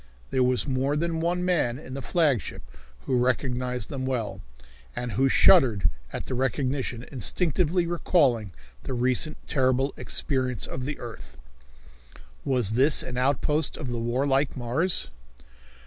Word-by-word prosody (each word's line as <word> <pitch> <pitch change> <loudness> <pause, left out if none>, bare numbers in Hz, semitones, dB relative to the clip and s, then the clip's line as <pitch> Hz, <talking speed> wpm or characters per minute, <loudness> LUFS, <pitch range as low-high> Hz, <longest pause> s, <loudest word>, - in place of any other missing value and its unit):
There 130 - +1
was 125 -1 +2
more 135 +2 0
than 165 +1 -1
one 175 +2 0
man 155 -10 +1
in 130 -3 -10
the 135 - -4
flagship 140 - 0 0.4
who 125 - 0
recognized 125 0 -1
them 135 -4 -4
well, 125 -5 -2 0.5
and 125 -1 -3
who 135 +7 +2
shuddered 120 - +5 0.2
at - - -5
the - - -4
recognition, 130 -1 -1
instinctively 170 - +1
recalling 140 - +1 0.3
the 130 - -4
recent 130 +5 +1
terrible 130 0 +1
experience 130 -6 -1
of 130 0 -5
the 145 +1 -4
earth. 115 -2 -10 1.1
Was 125 -6 +1
this 135 +6 +4
an 125 - -6
outpost 145 +4 0
of 130 - -5
the 120 - -2
warlike 135 +4 0
Mars? 130 - 0
130 Hz, 135 wpm, -26 LUFS, 125-150 Hz, 1.1 s, shuddered